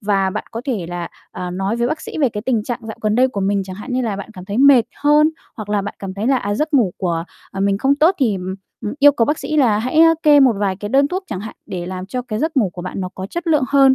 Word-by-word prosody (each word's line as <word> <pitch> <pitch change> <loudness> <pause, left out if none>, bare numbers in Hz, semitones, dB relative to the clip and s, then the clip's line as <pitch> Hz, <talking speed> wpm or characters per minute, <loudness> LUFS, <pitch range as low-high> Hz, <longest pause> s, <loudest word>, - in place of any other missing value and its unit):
Và 195 -2 +1
bạn - - -4
có 230 - -5
thể 220 -11 -2
là, 175 -1 -4 0.2
à, 180 0 -5
nói 195 +5 -2
với 235 - +1
bác 310 +1 -2
sĩ - - -7
về 270 - +4
cái 210 -1 -6
tình 235 -5 +1
trạng 240 - -3
dạo 220 - -6
gần 215 0 +1
đây 255 +2 +4
của 200 -5 -4
mình, 195 0 +1
chẳng 185 0 -8
hạn 210 +4 -7
như 255 - 0
là, 220 -4 -2
bạn 200 +2 -8
cảm 180 -4 -10
thấy 205 +4 -3
mệt 270 -4 +6 0.2
hơn, 295 +1 +4 0.3
hoặc 215 -2 -7
là 205 -1 0
bạn 205 - -5
cảm 190 -1 -6
thấy 205 +4 -3
là, 270 - +3
à, 205 -4 -2
giấc 305 +5 -1
ngủ 220 -10 +3
của, 170 -3 -1 0.3
à, 195 - -6
mình 200 0 +1
không 270 +4 +3
tốt, 320 +6 +4
thì, 235 -8 +2
ừm, 185 0 -5 0.3
ừm, 210 - -3
yêu 290 0 +7
cầu 235 - +2
bác 295 +5 0
sĩ 310 - -3
là 230 -7 +4
hãy, 255 +7 -1
a, 330 0 +7
kê 295 -2 +6
một 260 -3 +6
vài 195 -2 0
cái 205 +1 -6
đơn 275 +5 +3
thuốc 370 +4 -3
chẳng 190 -3 -5
hạn 220 - -8
để 180 -3 -5
làm 185 0 -5
cho 250 +4 -4
cái 225 -4 -4
giấc 315 +2 -2
ngủ 205 -8 +3
của 175 - -8
bạn 185 - -5
nó 185 - -3
có 190 0 -5
chất 345 - -6
lượng 305 -5 +3
hơn, 275 -1 +5
220 Hz, 315 wpm, -19 LUFS, 195-275 Hz, 0.3 s, yêu